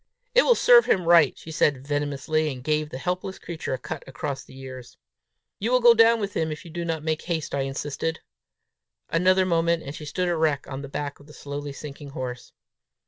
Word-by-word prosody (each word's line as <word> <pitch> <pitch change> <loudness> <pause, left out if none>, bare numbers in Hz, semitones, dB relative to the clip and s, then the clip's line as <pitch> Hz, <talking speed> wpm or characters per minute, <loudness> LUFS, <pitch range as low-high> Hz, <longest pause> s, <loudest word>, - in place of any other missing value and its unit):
"It - - +7
will 485 - +4
serve 485 0 +6
him 180 -3 +2
right," 165 -4 +5
she 160 - -10
said 145 -4 +1
venomously, 145 +2 -1
and 125 -2 -8
gave 150 +1 0
the 130 - -6
helpless 180 +5 -3
creature 160 -5 -4
a - - -6
cut 145 +4 -6
across 135 +2 -4
the 130 - -15
ears. 130 -2 -10 0.6
"You 225 +5 -1
will 255 - +5
go 240 -1 +8
down 230 0 +5
with 200 -1 -3
him, 160 -1 0
if 155 - -7
you 170 - -10
do 170 +1 -4
not 165 -2 -2
make 160 0 -1
haste," 165 -3 -3
I 140 - 0
insisted. 145 +4 -3 0.9
Another 185 +2 +4
moment 170 -1 +1
and 140 - -6
she 150 - -8
stood 180 +5 -2
erect 160 -4 +1
on 135 0 -6
the 140 - -8
back 145 0 -4
of 145 - -17
the 150 - -14
slowly 145 0 -6
sinking 145 0 -9
horse. 125 -1 -5
155 Hz, 210 wpm, -25 LUFS, 140-175 Hz, 0.9 s, go